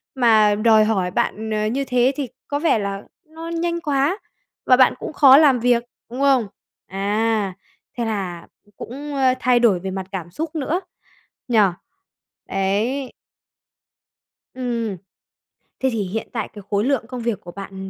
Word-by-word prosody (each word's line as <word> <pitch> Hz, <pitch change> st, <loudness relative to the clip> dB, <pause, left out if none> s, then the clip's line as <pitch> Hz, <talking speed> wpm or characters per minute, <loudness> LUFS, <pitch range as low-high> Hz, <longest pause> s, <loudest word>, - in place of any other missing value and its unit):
Mà 220 Hz, -4 st, +4 dB
đòi 215 Hz, 0 st, +4 dB
hỏi 190 Hz, -5 st, 0 dB
bạn, 220 Hz, +4 st, -1 dB
ờ, 215 Hz, 0 st, 0 dB
như 270 Hz, +5 st, -1 dB
thế 250 Hz, 0 st, +2 dB
thì 280 Hz, -4 st, -3 dB, 0.2 s
có 285 Hz, 0 st, -2 dB
vẻ 315 Hz, -8 st, +2 dB
là 200 Hz, 0 st, -4 dB, 0.2 s
nó 325 Hz, +1 st, -9 dB
nhanh 340 Hz, 0 st, -2 dB
quá, 290 Hz, +3 st, +1 dB, 0.5 s
và 255 Hz, -, +5 dB
bạn 260 Hz, -, +5 dB
cũng -, -, -6 dB
khó 275 Hz, -2 st, +8 dB
làm 280 Hz, -5 st, +5 dB
việc, 240 Hz, 0 st, +2 dB, 0.3 s
đúng 250 Hz, -, -6 dB
không? 265 Hz, -6 st, +3 dB, 0.4 s
À, 205 Hz, +1 st, 0 dB, 0.4 s
thế 235 Hz, -, -1 dB
là 190 Hz, -6 st, -4 dB, 0.3 s
cũng, 285 Hz, +4 st, -7 dB
ơ, 260 Hz, -2 st, +3 dB
thay 250 Hz, -1 st, +3 dB
đổi 215 Hz, -7 st, +3 dB
về 190 Hz, +2 st, -5 dB
mặt 190 Hz, 0 st, -4 dB
cảm 180 Hz, -4 st, -5 dB
xúc 315 Hz, -, -5 dB
nữa, 315 Hz, +4 st, -1 dB, 0.7 s
nhỉ? 235 Hz, -3 st, +3 dB, 0.9 s
Ấy. 215 Hz, +8 st, -1 dB, 1.4 s
Ừm. 235 Hz, -5 st, -3 dB, 0.8 s
Thế 265 Hz, -, +1 dB
thì 225 Hz, -3 st, -1 dB
hiện 200 Hz, +4 st, -4 dB
tại 225 Hz, -3 st, -2 dB
cái 205 Hz, -, -9 dB
khối 205 Hz, +1 st, +1 dB
lượng 265 Hz, -4 st, 0 dB
công 250 Hz, -2 st, -6 dB
việc 225 Hz, -4 st, -2 dB
của 175 Hz, -, -10 dB
bạn 195 Hz, 0 st, -8 dB
235 Hz, 160 wpm, -21 LUFS, 205-270 Hz, 1.4 s, khó